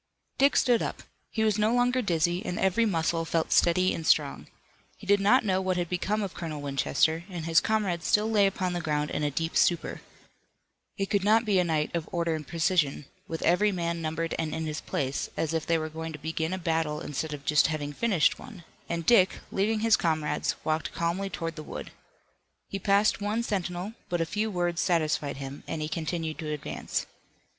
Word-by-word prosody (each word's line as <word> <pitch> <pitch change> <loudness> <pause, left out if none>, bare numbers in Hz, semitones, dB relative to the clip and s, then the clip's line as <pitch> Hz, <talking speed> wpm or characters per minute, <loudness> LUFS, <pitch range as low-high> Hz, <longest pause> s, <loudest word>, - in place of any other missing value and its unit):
Dick 275 +1 +5
stood 240 -2 +4
up. - - -4 0.3
He 220 - -1
was 215 -1 +2
no 215 +1 +3
longer 245 +1 +2
dizzy, 175 -3 +1
and 180 - -3
every 210 +5 +2
muscle 165 -3 0
felt 165 0 -1
steady 185 +2 +4
and 165 - -4
strong. - - +2 0.5
He - - -13
did 200 +1 +4
not 220 +5 +4
know 190 -2 +1
what 185 -1 0
had 175 -2 -1
become 205 +4 -1
of 195 - -4
Colonel 160 -3 -5
Winchester, 145 +3 +1
and 175 -4 -5
his 165 -1 +5
comrades 195 -6 0
still 210 +1 +3
lay 210 -3 +4
upon 185 -2 -2
the 175 - -2
ground 150 -1 -1
in - - -2
a 150 - +1
deep 165 +4 -3
stupor. 170 -2 +1 1.0
It 195 -1 -2
could 200 -2 +2
not 220 +3 +4
be 200 -3 +3
a - - +4
night 155 -3 -1
of 170 -1 -3
order 170 -1 0
and 155 -2 -5
precision, 165 -4 +1 0.2
with 165 - -4
every 205 +5 +3
man 170 -2 -2
numbered 165 +1 -2
and 160 -2 -2
in 160 - -3
his 155 0 -4
place, 135 0 -2
as 160 0 -1
if 160 -1 -2
they 165 - +3
were 155 0 -3
going 160 +1 -6
to - - -6
begin 160 +2 -3
a 185 - -1
battle 160 -3 -1
instead 155 0 -4
of 145 -1 -7
just 150 0 +4
having 150 -2 -3
finished 185 -5 +2
one, 215 -9 -11 0.3
and 170 -1 -2
Dick, 190 -6 +5
leaving 210 +3 +1
his 225 -1 +5
comrades, 155 -3 0
walked 155 0 -1
calmly 170 +4 -1
toward 165 -3 -4
the 155 - -6
wood. - - -7 0.8
He 195 - -4
passed 200 +2 +3
one 215 +3 0
sentinel, 190 -1 -3 0.2
but 175 - 0
a 165 - +1
few 210 +6 -1
words 175 -2 -1
satisfied 155 -6 0
him, 135 +1 -7
and 160 - -3
he 155 - -2
continued 160 0 -3
to 155 -1 -4
advance. 150 -2 -3
170 Hz, 205 wpm, -28 LUFS, 160-195 Hz, 1.0 s, Dick